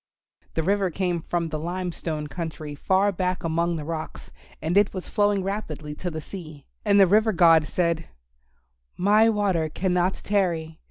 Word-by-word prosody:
The 160 - 0
river 195 +1 +1
came 175 -1 -1
from 170 0 -2
the 155 0 -3
Lime 175 +3 -3
Stone 155 -2 -4
country 155 -2 -6
far 190 +7 +2
back 185 -1 -2
among 170 +1 0
the 155 -2 -5
rocks, 160 0 -6 0.3
and 160 +3 -2
it 200 0 +3
was 185 - -5
flowing 205 -2 +1
rapidly 160 -7 -4
to 180 +4 -4
the 160 -2 -5
sea. 155 -4 -9 0.2
And 205 -1 +4
the 195 - +8
River 215 +4 +4
God 165 -4 +5
said, 170 -2 0 0.9
"My 210 +4 +5
water 195 -7 +1
cannot 180 +2 0
tarry. 170 -6 -1
175 Hz, 165 wpm, -25 LUFS, 160-195 Hz, 0.9 s, the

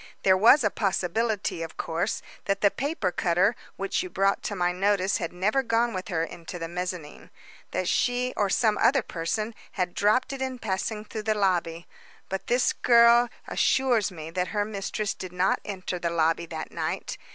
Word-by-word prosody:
There 190 -1 +6
was 235 +8 +6
a 210 - +2
possibility, 195 0 -1
of 165 -1 -6
course, 165 +1 -2 0.2
that 195 0 0
the 200 - +5
paper 275 - -2
cutter 180 +6 +2 0.2
which 195 0 -1
you 365 - -5
brought 195 - +1
to 205 - -2
my 175 -1 +1
notice 195 +1 +1
had 165 - -4
never 205 +9 +1
gone 235 -1 +1
with 185 -1 -4
her 165 -4 0
into 170 +1 -7
the 165 -1 -4
mezzanine. 175 -3 -6 0.4
That 185 - -2
she, 250 +4 +1
or 205 -2 +1
some 215 +1 +2
other 270 -2 +4
person, 210 +7 -3 0.2
had 180 -2 -1
dropped 235 +7 +2
it 270 - -6
in 260 -1 -2
passing 210 0 -3
through 220 0 -5
the 215 - +3
lobby. 175 -4 0 0.4
But 195 0 -4
this 245 +1 +2
girl 235 0 +5 0.2
assures 245 -7 +2
me 160 -2 -8
that 180 +1 -1
her 205 -1 -1
mistress 205 0 -3
did 185 -1 -8
not 180 +1 +2
enter 185 -3 -4
the 170 - -1
lobby 165 0 +1
that 160 -1 -6
night. - - -4
195 Hz, 185 wpm, -26 LUFS, 180-225 Hz, 0.4 s, There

